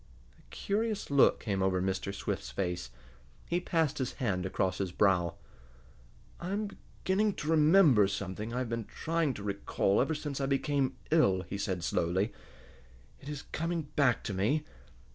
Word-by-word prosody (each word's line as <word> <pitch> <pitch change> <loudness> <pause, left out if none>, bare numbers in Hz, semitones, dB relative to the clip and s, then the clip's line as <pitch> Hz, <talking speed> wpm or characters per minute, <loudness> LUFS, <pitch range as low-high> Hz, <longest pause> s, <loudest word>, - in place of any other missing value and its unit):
A - - -21
curious 210 -3 -2
look 140 -1 +5
came 100 -4 -1
over 95 -1 +2
Mr. 95 +1 -1
Swift's 80 -9 -4
face. 90 +6 -3 0.6
He 175 - 0
passed 160 -5 0
his 130 -2 -2
hand 95 -7 -1
across 95 -1 -1
his 95 -3 -1
brow. 90 -3 +2 1.0
"I 175 - -5
am 210 0 -1 0.3
beginning 200 +2 +2
to 150 - -2
remember 155 - +6
something 100 +2 -4
I 120 - -3
have 125 -2 -2
been 115 -2 -3
trying 165 -5 -1
to 100 - -7
recall 100 0 +1
ever 155 +5 0
since 145 -2 -4
I 135 - 0
became 140 0 0
ill," 100 - +4
he 100 - -6
said 95 -3 -2
slowly. 90 +6 0 0.9
"It 140 - -10
is 145 -1 -5
coming 165 -2 -2
back 140 -6 +3
to 100 - -3
me. 135 +12 +1
125 Hz, 160 wpm, -31 LUFS, 95-155 Hz, 1.0 s, remember